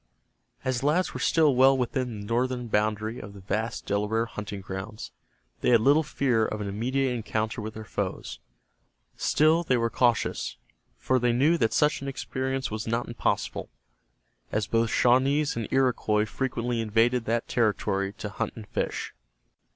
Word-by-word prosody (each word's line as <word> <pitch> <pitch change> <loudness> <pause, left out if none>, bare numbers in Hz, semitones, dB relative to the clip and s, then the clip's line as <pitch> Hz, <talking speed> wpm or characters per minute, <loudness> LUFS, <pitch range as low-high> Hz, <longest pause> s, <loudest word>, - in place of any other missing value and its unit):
As 130 -1 0
the 135 - -1
lads 180 +5 +1
were - - -5
still 155 -4 +3
well 135 +1 +5
within 125 -2 -2
the - - -8
northern 125 +2 -1
boundary 110 +2 0
of 100 -1 -9
the 100 - -11
vast 110 +4 -3
Delaware 105 +3 0
hunting 105 -3 -6
grounds, 95 - -7 0.5
they - - +1
had 120 -2 +6
little 145 +6 +5
fear 135 -6 +1
of 110 -1 -2
an 105 - -3
immediate 125 +6 0
encounter 110 -1 -2
with 110 +1 -6
their 110 0 -7
foes - - -4 0.8
Still 155 +3 +3
they 130 -7 +1
were 115 -1 0
cautious, 120 -3 +1 0.4
for 130 0 +1
they 120 0 +2
knew 145 +8 +4
that 110 - +2
such 150 +3 +2
an 140 - -5
experience 130 -1 -3
was 110 +1 -4
not 115 +1 -1
impossible, 120 - -2 0.8
as 105 -1 0
both 115 +2 +1
Shawnees 135 +6 +3
and 115 -2 -3
Iroquois 120 -5 +2
frequently 120 -1 -2
invaded 115 +2 +2
that 115 +1 -1
territory 100 -4 0
to 105 - -6
hunt 115 +1 -3
and 110 -3 -9
fish. - - -3
115 Hz, 165 wpm, -27 LUFS, 110-130 Hz, 0.8 s, had